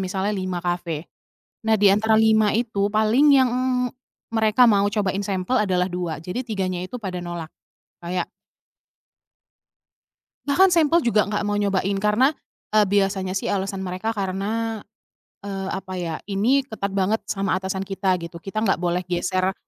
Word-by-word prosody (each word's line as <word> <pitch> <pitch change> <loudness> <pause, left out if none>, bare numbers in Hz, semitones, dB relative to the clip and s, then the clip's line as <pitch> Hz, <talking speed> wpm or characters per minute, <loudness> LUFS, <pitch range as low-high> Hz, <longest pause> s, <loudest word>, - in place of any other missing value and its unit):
misalnya 190 +2 -1
5 185 -3 -3
kafe. 175 -3 -2 0.6
Nah, 220 - +5
di 205 - +6
antara 220 +2 +3
5 220 -1 +4
itu, 220 -4 0
paling 220 +6 +3
yang 255 -2 +3 0.8
mereka 220 +2 +4
mau 200 -2 +4
cobain 200 -2 0
sampel 195 +5 -1
adalah 180 -2 +1
2, 175 -3 -3
jadi 185 +8 -3
3-nya 190 -6 -2
itu 185 +7 -6
pada 185 -4 -4
nolak. 175 -2 -5 0.5
Kayak 175 0 -3 2.2
Bahkan 365 +7 +4
sampel 330 +1 +4
juga 230 -7 +2
nggak 205 0 -2
mau 205 0 0
nyobain, 200 -1 0
karena, 210 +9 +2 0.4
eee, 210 -1 +6
biasanya 195 -1 0
sih 190 - -2
alasan 195 0 -2
mereka 190 +4 -3
karena, 210 +3 -2 0.6
eee, 195 -1 -4
apa 190 -1 -5
ya, 165 -2 -3
"Ini 235 +8 +1
ketat 215 -5 -4
banget 200 +3 +1
sama 195 -2 -1
atasan 190 0 -3
kita," 190 -1 0
gitu, 170 0 -8
"kita 215 +4 -3
nggak 195 - +2
boleh 175 +1 0
geser 185 +1 0
195 Hz, 150 wpm, -23 LUFS, 185-215 Hz, 2.2 s, di